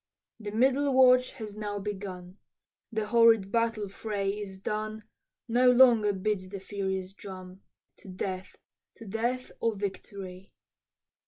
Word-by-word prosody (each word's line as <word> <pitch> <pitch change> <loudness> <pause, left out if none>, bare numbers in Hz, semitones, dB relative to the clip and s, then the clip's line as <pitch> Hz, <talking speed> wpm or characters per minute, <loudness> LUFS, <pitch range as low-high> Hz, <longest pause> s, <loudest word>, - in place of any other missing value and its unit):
The 210 -2 -5
middle 265 +6 +2
watch 255 -1 +5
has 215 -5 -8
now 205 -1 -4
begun, 190 -2 -6 0.5
The 220 -1 -1
horrid 225 -3 +5
battle 230 -2 0
fray 200 0 -2
is 200 -2 -6
done, 215 +2 -3 0.4
No 245 +2 +4
longer 240 -4 +6
beats 190 -1 -2
the 195 0 -6
furious 190 -1 -4
drum, 185 -1 -10 0.4
To - - -16
death, 185 0 -5 0.4
to 230 - -12
death 240 +5 -2
or 230 -2 0
victory. 195 -1 -7
210 Hz, 130 wpm, -29 LUFS, 195-230 Hz, 0.5 s, longer